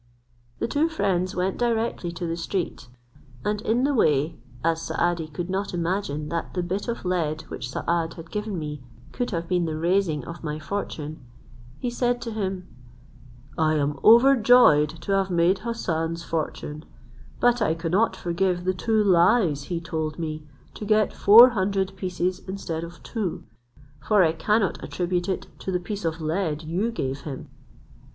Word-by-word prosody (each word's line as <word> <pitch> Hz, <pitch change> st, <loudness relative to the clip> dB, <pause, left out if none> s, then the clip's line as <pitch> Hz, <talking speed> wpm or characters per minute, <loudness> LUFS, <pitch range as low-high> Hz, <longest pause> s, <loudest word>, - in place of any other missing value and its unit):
The -, -, -1 dB
two 300 Hz, +6 st, +1 dB
friends 190 Hz, -, 0 dB
went 185 Hz, +1 st, -1 dB
directly 230 Hz, -6 st, 0 dB
to 175 Hz, +1 st, -4 dB
the 165 Hz, 0 st, -2 dB
street, 170 Hz, -4 st, -3 dB, 0.6 s
and 210 Hz, 0 st, 0 dB
in 230 Hz, +3 st, +1 dB
the 285 Hz, +1 st, +2 dB
way, 155 Hz, -, +2 dB, 0.3 s
as 165 Hz, 0 st, +1 dB
Saadi 170 Hz, -2 st, -1 dB
could 165 Hz, +3 st, -5 dB
not 190 Hz, 0 st, -2 dB
imagine 165 Hz, -4 st, -2 dB
that 170 Hz, +2 st, -4 dB
the 180 Hz, -, 0 dB
bit 190 Hz, +5 st, -3 dB
of 235 Hz, -5 st, -4 dB
lead 160 Hz, -4 st, -1 dB
which 125 Hz, -, -5 dB
Saad 165 Hz, +4 st, -1 dB
had 165 Hz, -1 st, -11 dB
given 210 Hz, -2 st, -3 dB
me 150 Hz, -3 st, -5 dB, 0.3 s
could 245 Hz, -, -2 dB
have 170 Hz, -3 st, -3 dB
been 180 Hz, -1 st, +1 dB
the 155 Hz, -1 st, -3 dB
raising 170 Hz, -2 st, +1 dB
of 170 Hz, 0 st, -9 dB
my 150 Hz, -1 st, -3 dB
fortune, 155 Hz, -4 st, -5 dB, 0.5 s
he 245 Hz, -, -3 dB
said 245 Hz, 0 st, 0 dB
to 230 Hz, -, -4 dB
him, 190 Hz, -4 st, -3 dB, 0.9 s
"I 155 Hz, 0 st, +3 dB
am 145 Hz, -1 st, 0 dB
overjoyed 235 Hz, -, +6 dB
to -, -, -4 dB
have 195 Hz, -1 st, +2 dB
made 175 Hz, +2 st, +3 dB
Hassan's 165 Hz, -8 st, -2 dB
fortune: 155 Hz, -2 st, -4 dB, 0.6 s
but 245 Hz, 0 st, +3 dB
I 160 Hz, -6 st, +2 dB
cannot 180 Hz, +5 st, +1 dB
forgive 180 Hz, 0 st, -1 dB
the 185 Hz, +1 st, +1 dB
two 215 Hz, +3 st, +1 dB
lies 170 Hz, -5 st, +3 dB
he 175 Hz, +1 st, -3 dB
told 160 Hz, -2 st, -3 dB
me, 155 Hz, -2 st, -4 dB, 0.3 s
to -, -, -8 dB
get 215 Hz, 0 st, +2 dB
four 230 Hz, +5 st, +9 dB
hundred 195 Hz, -3 st, -1 dB
pieces 185 Hz, -1 st, -2 dB
instead 170 Hz, -4 st, -4 dB
of 170 Hz, 0 st, -10 dB
two; 210 Hz, -7 st, -3 dB, 0.6 s
for 200 Hz, +7 st, +3 dB
I 160 Hz, -, +3 dB
cannot 200 Hz, +5 st, 0 dB
attribute 175 Hz, 0 st, -2 dB
it 190 Hz, -, -2 dB
to 190 Hz, -, -4 dB
the 180 Hz, -, 0 dB
piece 195 Hz, +1 st, -5 dB
of 160 Hz, 0 st, -1 dB
lead 160 Hz, -1 st, -1 dB
you 180 Hz, +8 st, -1 dB
gave 135 Hz, -, -3 dB
him." 140 Hz, -3 st, -7 dB
180 Hz, 165 wpm, -25 LUFS, 160-205 Hz, 0.9 s, four